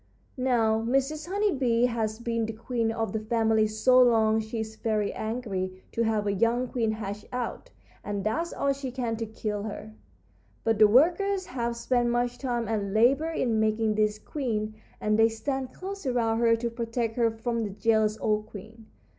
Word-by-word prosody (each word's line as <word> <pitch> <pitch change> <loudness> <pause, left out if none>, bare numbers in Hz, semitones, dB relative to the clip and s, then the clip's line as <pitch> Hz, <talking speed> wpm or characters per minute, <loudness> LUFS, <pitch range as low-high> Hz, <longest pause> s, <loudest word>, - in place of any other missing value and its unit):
"Now, 235 -4 +2
Mrs. 275 +7 0
Honey 405 +2 +1
Bee 245 -5 +2
has 220 -3 -1
been 230 -1 -2
the 225 - -4
queen 230 0 -1
of 225 -3 -2
the 220 - 0
family 220 0 +2
so 250 +4 +4
long 220 -3 +4
she 220 +1 -4
is 220 0 -6
very 215 -2 -1
angry 195 -5 -4
to 230 - -2
have 220 -2 +1
a 200 - +1
young 230 +5 +1
queen 230 -3 0
hatch 210 -1 -5
out, 250 -1 -4 0.3
and 205 -1 -3
does 325 +11 -1
all 280 0 0
she 270 -1 -5
can 245 -2 -2
to 225 0 -3
kill 210 -1 -4
her. 205 - -7 0.7
But 225 -2 +1
the 215 - +8
workers 360 - +3
have 235 -2 -3
spent 240 0 +1
much 245 +1 0
time 240 -4 -2
and 205 -2 -2
labor 270 +8 +4
in 240 -8 0
making 220 0 +1
this 215 0 +1
queen, 215 -4 -3 0.3
and 215 +1 +1
they 225 0 +6
stand 260 +3 -3
close 390 -3 -7
around 230 -3 +1
her 230 -1 +4
to 235 +1 -3
protect 230 -1 -2
her 235 -1 +3
from 230 +1 -2
the 210 - -3
jealous 215 +1 +1
old 215 -1 0
queen. 220 +2 -12
230 Hz, 185 wpm, -27 LUFS, 215-245 Hz, 0.7 s, the